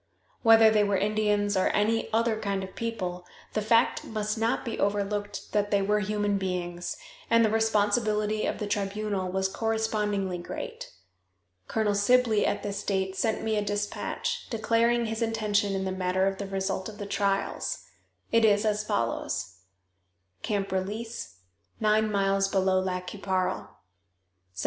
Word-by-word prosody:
Whether 225 -1 +7
they 210 -1 +4
were 200 -1 +1
Indians 205 0 +1
or 185 - +3
any 225 +2 +1
other 225 0 +2
kind 200 -2 -2
of 190 - -9
people, 185 -6 -3 0.3
the 215 - 0
fact 230 +2 +3
must 215 -1 -2
not 225 +3 0
be 230 - -4
overlooked 205 0 -1
that 205 -1 +1
they 200 -1 +2
were 210 +2 +2
human 205 0 0
beings, 175 -2 -3 0.3
and 230 0 +5
the 215 - +1
responsibility 215 -1 +1
of - - -2
the 210 - -3
tribunal 200 -2 -2
was 190 0 +1
correspondingly 210 -3 -1
great. 175 - -7 0.8
Colonel 215 -2 +1
Sibley 220 +1 +3
at 205 0 -1
this 200 -1 -3
date 190 -1 -1
sent 220 +2 0
me 220 -1 0
a 210 - +1
dispatch, 205 - -3
declaring 235 +1 +2
his 225 +1 -3
intention 215 -3 +1
in 190 0 -1
the 190 - -1
matter 185 0 0
of 195 0 -1
the 200 - -4
result 190 0 -2
of 210 - -11
the 205 - -5
trials. 200 0 -1 0.5
It 230 0 +4
is 210 0 +4
as 210 0 +1
follows: 95 - -2 0.9
"CAMP 200 -2 -2
RELEASE, 205 - -4 0.4
NINE 215 0 +2
MILES 195 -1 +2
BELOW 190 -1 +2
LAC 180 -1 -2
QUI 205 - -7
PARLE, 185 -1 -2 0.8
Sept. - - -8
205 Hz, 155 wpm, -28 LUFS, 195-220 Hz, 0.9 s, Whether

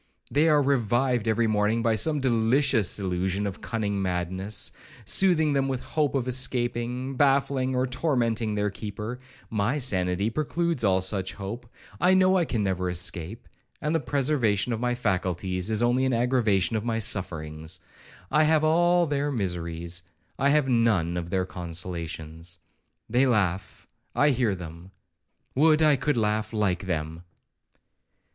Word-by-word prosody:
They 155 +3 +3
are 150 -2 +4
revived 125 -2 +1
every 110 +1 +2
morning 110 +1 +1
by 115 0 +2
some 150 +8 +1
delicious 120 -3 +2
illusion 95 +1 -1
of 100 -2 -5
cunning 100 -3 -2
madness, 95 +2 -2 0.3
soothing 160 -6 +3
them 135 -1 +1
with 130 -2 -2
the - - -14
hope 150 -3 0
of 130 -2 -1
escaping, 125 0 -1
baffling 135 -1 +2
or 125 +1 +1
tormenting 120 -5 0
their 105 0 0
keeper; 105 +4 -6 0.3
my 110 +6 0
sanity 100 -5 0
precludes 160 +1 -1
all 95 -2 +3
such 95 -1 -2
hope. 115 +4 -7 0.3
I 185 +1 +4
know 185 0 +4
I 170 - +1
never 95 -5 0
can - - -1
escape, 90 +3 -3 0.3
and 150 +1 -1
the 165 - +2
preservation 125 -6 0
of 110 - -3
my 120 0 0
faculties 95 -3 -1
is 110 +1 +1
only 125 +2 +2
an 130 - +1
aggravation 115 -5 +1
of 110 - -1
my 115 -1 -1
sufferings. 80 -5 -2 0.5
I 150 +3 +4
have 155 0 +3
all 175 +2 +3
their 145 -1 -1
miseries,—I 90 - -3
have 145 -1 +3
none 110 -9 +2
of 85 -1 -4
their 95 0 0
consolations. 85 -1 -6 0.5
They 125 +4 +3
laugh,—I 105 +6 -1
hear 120 -6 +1
them; 85 0 -10 0.6
would 155 +3 +4
I 150 -2 +5
could 145 +1 -1
laugh 110 0 0
like 100 -3 0
them.' 80 -1 -3
110 Hz, 145 wpm, -26 LUFS, 95-135 Hz, 0.6 s, I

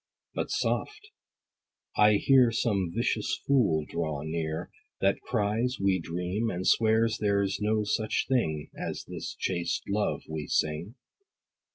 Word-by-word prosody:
But - - -2
soft: 425 0 -2 0.8
I 105 0 +6
hear 125 +3 +5
Some 100 -6 0
vicious 115 +4 -1
fool 100 - +3
draw 80 -4 -3
near, 80 0 -3 0.3
That 100 0 +2
cries, 115 +3 0
we 95 -1 +2
dream, 90 +7 -2
and 95 -2 -3
swears 110 0 +3
there's 100 -2 +1
no 105 +1 +1
such 110 +1 0
thing, 80 - 0
As - - -5
this - - -6
chaste 85 -1 -2
love 105 +1 -1
we 80 -2 -5
sing. 80 - -1
100 Hz, 130 wpm, -28 LUFS, 85-115 Hz, 0.8 s, I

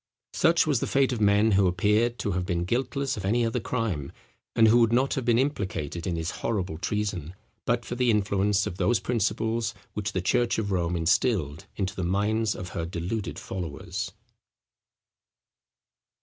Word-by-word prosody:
Such 165 +1 +4
was 145 -6 +2
the - - -2
fate 135 -1 +2
of 115 - -3
men 105 +2 +4
who 95 -1 +4
appear 105 +6 +2
to 120 -4 -4
have 90 0 -1
been 85 -1 -1
guiltless 130 +5 -1
of 100 - -5
any 115 +5 +2
other 115 - -1
crime, 105 - -2 0.4
and 115 - +6
who 115 +2 +6
would 115 -1 +4
not 130 +3 +2
have 130 - -2
been 120 -1 +4
implicated 95 - -2
in 90 - -1
this 80 0 -2
horrible 95 -8 -2
treason, 100 -5 -2 0.3
but - - 0
for - - -5
the 125 0 +1
influence 100 -1 +2
of 90 - -5
those 120 +2 +2
principles 115 +1 -1 0.2
which 105 0 -3
the - - 0
church 120 +3 +2
of 105 -2 -2
Rome 90 -2 0
instilled 80 - +1
into 95 -2 -2
the 95 - -3
minds 105 +4 +1
of 90 0 -6
her 85 -1 -4
deluded 90 +5 -4
followers. 85 -6 -5
105 Hz, 175 wpm, -27 LUFS, 90-115 Hz, 0.4 s, and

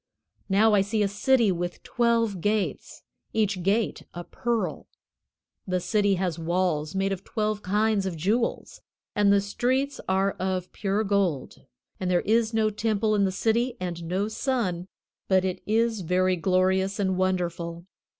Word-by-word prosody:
Now 210 +3 +4
I 205 - +5
see 210 +2 0
a - - +2
city 230 +2 +2
with 175 0 -4
twelve 230 -5 +1
gates, 210 +1 -2 0.3
each 205 -4 0
gate 205 +5 0
a 175 - -5
pearl. 235 +4 -3 0.8
The 185 -1 0
city 205 +2 +1
has 180 -3 -2
walls 165 -1 -1
made 195 0 0
of 190 0 -4
twelve 215 -1 -2
kinds 210 0 +1
of 175 -3 -4
jewels, 215 +9 -1 0.3
and 205 -2 +4
the 200 - +5
streets 255 +7 -1
are 190 +1 +2
of 185 -1 -2
pure 205 +1 -1
gold, 195 -9 -1 0.3
and 185 - -2
there 180 -1 +3
is 225 +1 +2
no 220 -1 +1
temple 215 0 0
in 200 -1 +3
the 190 - 0
city 230 +5 0
and 175 -2 -4
no 185 +5 -1
sun, 215 -7 -2 0.4
but 190 -1 +3
it 185 -1 -3
is 225 0 +1
very 185 +2 +2
glorious 190 +2 +1
and 190 -2 0
wonderful. 175 -2 -2
195 Hz, 155 wpm, -26 LUFS, 185-220 Hz, 0.8 s, I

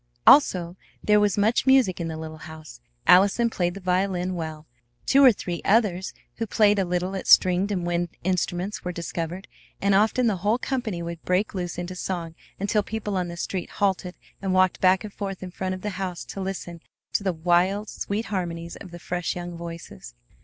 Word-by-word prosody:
Also 180 - +5 0.3
there 210 0 +4
was 210 0 +2
much 220 +5 +2
music 260 -10 +4
in 165 - -2
the 160 -1 -5
little 155 0 -7
house. 155 - -11 0.2
Allison 200 +6 +5
played 175 -2 -1
the - - -6
violin 185 0 0
well; 160 -3 -5 0.4
two 275 +1 +5
or 260 - +9
three 175 -5 -5
others 195 -4 +2 0.3
who 225 - -2
played 205 0 +3
a 195 - +1
little 180 +2 -2
at 190 - -5
stringed 185 +2 +5
and 180 -3 -1
wind 175 0 -1
instruments 180 +2 -1
were 180 - -3
discovered; 170 +1 -5 0.3
and 200 0 +2
often 220 +5 +3
the 215 -4 +2
whole 210 +6 +1
company 240 -9 -3
would 170 -1 -6
break 185 +4 0
loose 180 -3 -4
into 175 +1 -4
song 175 -3 -4 0.3
until 205 +2 +1
people 210 -1 -4
on 180 -1 -1
the 170 0 -7
street 180 +1 -4
halted 190 -3 -1 0.3
and 190 -1 0
walked 185 -1 +3
back 185 0 +4
and 210 -2 -8
forth 195 -2 -5
in 185 - -7
front 185 +1 -3
of 185 - -10
the 210 - -3
house 180 -2 -4
to 195 - -7
listen 180 -3 -5 0.3
to - - +1
the 190 - +1
wild, 180 +5 +1
sweet 210 +3 -3
harmonies 170 -3 -4
of 190 - -10
the 175 - -9
fresh 175 +1 -3
young 175 -1 -6
voices. 165 - -9
185 Hz, 195 wpm, -25 LUFS, 175-200 Hz, 0.4 s, or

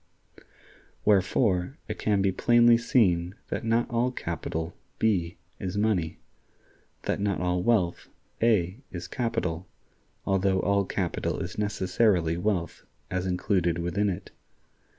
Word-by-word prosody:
Wherefore, 100 - +2
it - - -5
can 100 -2 +2
be 95 - +3
plainly 120 +4 +5
seen 100 -8 +2
that - - -3
not 115 +1 +2
all 120 +1 +2
capital, 85 -6 -4 0.2
B, 90 -6 +1 0.2
is 95 +1 -3
money; 100 -6 0 0.9
that - - -1
not 100 -2 0
all 90 0 0
wealth, 90 -4 +1 0.3
A, 105 -3 +2
is 90 -1 -6
capital, 95 -7 -2 0.6
although 95 -1 +2
all 100 +1 +2
capital 90 -2 -2
is - - -5
necessarily 95 -4 +1
wealth 90 -1 -1 0.3
as 95 0 -1
included 90 -2 +1
within 90 +4 0
it. 95 +1 -5
95 Hz, 120 wpm, -27 LUFS, 90-110 Hz, 0.9 s, plainly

